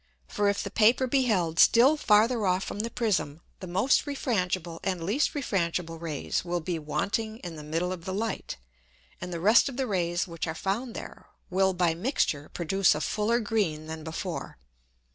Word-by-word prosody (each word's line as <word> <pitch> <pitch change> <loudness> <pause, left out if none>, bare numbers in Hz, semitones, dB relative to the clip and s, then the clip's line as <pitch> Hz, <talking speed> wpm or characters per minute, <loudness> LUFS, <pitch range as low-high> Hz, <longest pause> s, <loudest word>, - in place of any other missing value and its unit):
For 205 - +1
if 200 - -1
the 200 - -6
Paper 230 +5 +4
be 260 +1 +2
held 175 -8 0
still 255 +6 +6
farther 220 -4 +3
off 185 +1 +1
from - - -6
the 230 +2 -2
Prism, 185 -11 -1 0.2
the 185 - -7
most 195 - +2
refrangible 185 - -2
and 185 -3 -2
least 225 - 0
refrangible 170 - -2
Rays 155 -4 -2
will 175 0 -2
be 170 0 -3
wanting 200 +9 -2
in 175 -2 -6
the 155 - -8
middle 165 +4 -2
of 170 -3 -9
the 190 - -3
Light, - - -5 0.6
and 180 - -5
the 170 - -4
rest 215 +9 +5
of 260 - -8
the 265 - 0
Rays 175 -5 -1
which 170 -2 -5
are 160 - -3
found 220 +8 -3
there, - - -9 0.2
will 190 +1 +2
by 175 -2 +2
mixture 165 - -1
produce 180 +1 +2
a 150 - -3
fuller 220 +7 +1
green 205 -9 -1
than 160 0 -7
before. 160 - -5
185 Hz, 185 wpm, -28 LUFS, 165-220 Hz, 0.6 s, still